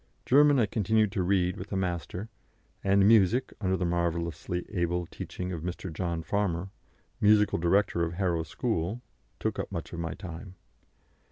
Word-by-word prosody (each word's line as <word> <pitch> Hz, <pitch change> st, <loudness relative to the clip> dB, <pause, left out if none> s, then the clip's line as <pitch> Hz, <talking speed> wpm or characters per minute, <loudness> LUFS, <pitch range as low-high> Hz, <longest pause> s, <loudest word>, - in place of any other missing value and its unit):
German 145 Hz, +2 st, +6 dB
I 120 Hz, -, +4 dB
continued 110 Hz, 0 st, +1 dB
to 100 Hz, -3 st, -1 dB
read 90 Hz, 0 st, +1 dB
with 95 Hz, +1 st, -8 dB
a -, -, -1 dB
master, 90 Hz, +2 st, -3 dB, 0.6 s
and 100 Hz, 0 st, +4 dB
music, 110 Hz, +3 st, +4 dB
under 95 Hz, -1 st, +1 dB
the 90 Hz, -, -1 dB
marvellously 85 Hz, 0 st, -1 dB
able 85 Hz, 0 st, 0 dB
teaching 90 Hz, +2 st, -6 dB
of 85 Hz, -3 st, -4 dB
Mr. 90 Hz, 0 st, -5 dB
John 85 Hz, -1 st, -2 dB
Farmer, 95 Hz, 0 st, -1 dB, 0.5 s
musical 105 Hz, -3 st, +4 dB
director 85 Hz, +1 st, +2 dB
of 85 Hz, 0 st, -2 dB
Harrow 85 Hz, -2 st, 0 dB
School, 85 Hz, -, -2 dB, 0.4 s
took -, -, -2 dB
up -, -, -4 dB
much -, -, -5 dB
of 85 Hz, -, -5 dB
my 80 Hz, -1 st, -3 dB
time. 95 Hz, -1 st, -8 dB
90 Hz, 160 wpm, -29 LUFS, 85-100 Hz, 0.6 s, German